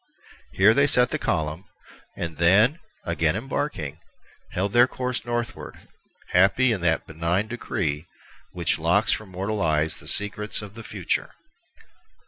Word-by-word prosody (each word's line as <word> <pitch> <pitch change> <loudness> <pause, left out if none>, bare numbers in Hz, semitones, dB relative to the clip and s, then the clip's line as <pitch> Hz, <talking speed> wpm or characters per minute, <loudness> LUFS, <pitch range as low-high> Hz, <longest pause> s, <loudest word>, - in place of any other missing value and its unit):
Here 100 +4 +5
they 140 +3 +3
set 125 -2 +6
the - - -1
column, 80 +3 -2 0.5
and 85 -3 -5
then, 105 - +4 0.3
again 85 -1 +1
embarking, 110 - -4 0.5
held 100 +2 -2
their 120 +1 +6
course 125 -1 -3
northward, 120 0 -4 0.5
happy 100 +8 +4
in 105 -5 -2
that 80 -3 +1
benign 85 +6 -1
decree 85 -9 -3 0.4
which 85 -3 0
locks 85 +7 +2
from 110 -2 -2
mortal 100 +3 -3
eyes 80 -1 +1
the - - -12
secrets 105 +1 -1
of 100 -1 -10
the 115 - -10
future. 100 -5 -3
95 Hz, 135 wpm, -24 LUFS, 85-115 Hz, 0.5 s, set